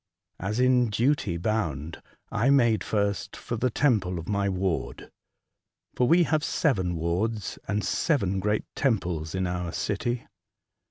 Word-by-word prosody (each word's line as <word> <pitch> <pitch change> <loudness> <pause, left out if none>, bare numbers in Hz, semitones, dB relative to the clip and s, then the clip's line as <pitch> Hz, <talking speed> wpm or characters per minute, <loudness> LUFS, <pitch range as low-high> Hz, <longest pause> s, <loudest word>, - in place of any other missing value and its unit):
As 100 +5 -2
in 125 -2 +4
duty 110 -5 +1
bound, 85 -6 -2 0.3
I 115 +6 +2
made 120 -6 +4
first 100 -2 -1
for 120 - -4
the 125 +3 +1
temple 110 -9 +1
of 85 - -6
my 100 -1 0
ward 95 -2 -2 0.8
(for 125 - +2
we 175 +6 +5
have 155 -2 +1
seven 95 - +1
wards 95 +6 -2
and 105 0 -1
seven 100 - +1
great 105 +2 0
temples 90 - -1
in 95 0 0
our 90 -1 -2
city). 115 +6 -2
105 Hz, 140 wpm, -27 LUFS, 90-120 Hz, 0.8 s, we